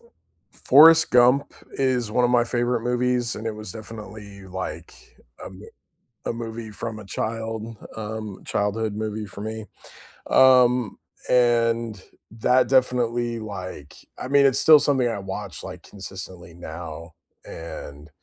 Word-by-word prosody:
F 470 - -24 0.4
Forrest 160 +3 +6
Gump 125 +3 +4 0.2
is 130 -4 0
one 125 +3 +2
of 120 - +2
my 120 -1 +4
favorite 120 0 0
movies, 125 0 0
and 110 - -6
it 110 - -2
was 105 -3 -8
definitely 105 -2 -10
like 95 0 -6 0.5
a - - -8
m - - -11 0.6
a - - 0
movie 115 -1 -6
from 110 +1 -6
a 110 - -10
child, 110 +2 -4 0.2
um, 110 -2 -6
childhood 105 +1 -1
movie 110 0 -4
for 100 0 -9
me, 110 0 -5 0.7
um, 125 -3 +5 0.3
and 115 -3 +2 0.3
that 125 +4 +2
definitely 120 -2 +1
like, 95 -8 -8 0.2
I - - -6
mean 140 +1 +4
it's 135 -2 +3
still 155 -2 +8
something 135 -4 +2
I 115 -4 -2
watch 95 -2 -6
like 90 -2 -9
consistently 95 -3 -9
now, 85 -1 -8 0.3
and 75 -2 -9
110 Hz, 140 wpm, -24 LUFS, 100-125 Hz, 0.7 s, still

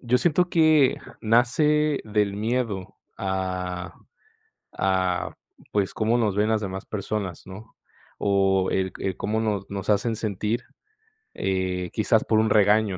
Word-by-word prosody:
yo 125 0 +2
siento 175 +5 +2
que 155 -5 +4 0.2
nace 145 +6 +2
del 105 -2 0
miedo 105 -3 -2 0.2
a 90 -1 -3 0.8
a, 95 -1 0 0.3
pues, 100 -2 0
cómo 115 +2 +1
nos 105 -4 +1
ven 105 +2 +2
las 110 -1 +1
demás 95 -1 -5
personas, 100 -4 -4
¿no?, 100 +4 -11 0.4
o 95 -1 +2
el 95 -1 0
c - - -5
el 95 - -2
cómo 110 +2 -1
no 105 -3 0
nos 100 0 -6
hacen 110 +2 +1
sentir, 110 +3 -2 0.8
eh, 95 -2 -1
quizás, 110 0 +2
por 110 -1 +2
un 110 - +2
regaño, 105 -1 +3
105 Hz, 140 wpm, -25 LUFS, 95-115 Hz, 0.8 s, que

